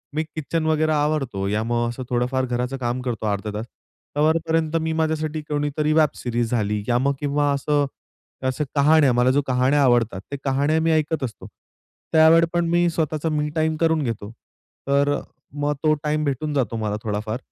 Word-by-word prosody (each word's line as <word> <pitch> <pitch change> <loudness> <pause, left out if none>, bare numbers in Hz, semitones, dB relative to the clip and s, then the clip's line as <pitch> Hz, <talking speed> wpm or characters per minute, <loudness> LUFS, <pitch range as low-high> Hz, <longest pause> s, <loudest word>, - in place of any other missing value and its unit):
मी 155 - +1
kitchen 160 +1 -3
वगैरे 155 0 +2
आवरतो 145 -10 0
या 105 +2 0
मग 120 +1 0
असं 120 +2 -6
थोडंफार 125 +2 0
घराचं 125 +2 -2
काम 125 0 -2
करतो 120 -3 -3
अर्धा 105 +1 -2
तास, 105 +2 -4 0.5
तोवरपर्यंत 160 +1 +1
मी, 160 - -1
माझ्यासाठी 155 -1 -1
कोणीतरी 150 +1 0
वेब 155 -1 +4
सीरीज 120 -1 -2
झाली 105 -3 0
या 120 - +2
मग 140 +3 +1
किंवा 145 0 +1
असं 145 +1 +1 0.6
अशा 130 +4 -1
कहाण्या, 145 -1 +5
मला 125 +1 +3
जो 145 - +2
कहाण्या 130 +3 +2
आवडतात. 120 -6 +2
त्या 140 - -4
कहाण्या 140 +4 +1
मी 165 - +2
ऐकत 155 -1 0
असतो 120 -4 -6 0.7
त्यावेळी 160 +1 +6
पण 170 0 +1
मी 175 +1 +3
स्वतःचा 160 -1 -1
मी 150 -1 -1
टाईम 160 0 +1
करून 160 -2 +2
घेतो. 110 -4 -4 0.6
तर 140 +1 +2 0.4
मग 145 0 +1
तो 155 -1 +4
टाईम 150 0 0
भेटून 145 +1 -2
जातो 125 -6 0
मला 105 -2 -2
थोडाफार. 110 +1 -2
145 Hz, 175 wpm, -22 LUFS, 120-155 Hz, 0.7 s, त्यावेळी